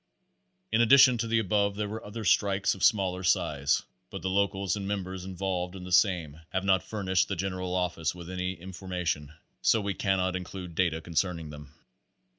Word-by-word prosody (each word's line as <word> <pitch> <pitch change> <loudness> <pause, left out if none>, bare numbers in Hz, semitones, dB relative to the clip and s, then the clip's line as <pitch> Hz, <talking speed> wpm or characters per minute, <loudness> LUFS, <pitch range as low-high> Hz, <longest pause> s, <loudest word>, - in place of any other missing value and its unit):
In 115 - +3
addition 130 0 +7
to 115 - -1
the 115 0 +2
above 100 -1 +1
there 105 0 -2
were 110 +2 -6
other 110 +1 -7
strikes 100 +1 +3
of 95 - -7
smaller 95 -3 +3
size, 70 -5 +1 0.3
but 100 -2 -7
the 95 - -1
locals 100 0 +1
and 100 -1 -4
members 95 -2 -4
involved 95 -1 -3
in 95 - -8
the 90 - -8
same 85 -6 +2
have 95 0 -2
not 95 -2 +4
furnished 95 -3 0
the 95 - -2
General 90 0 -3
Office 90 -3 -1
with 85 -1 -9
any 90 0 -3
in 95 +2 -9
formation, 85 -5 -3 0.3
so 115 - +4
we 100 -1 -2
cannot 95 -2 0
include 90 -1 -6
data 80 -2 0
concerning 85 -1 -2
them. 75 0 -12
95 Hz, 185 wpm, -28 LUFS, 90-100 Hz, 0.3 s, addition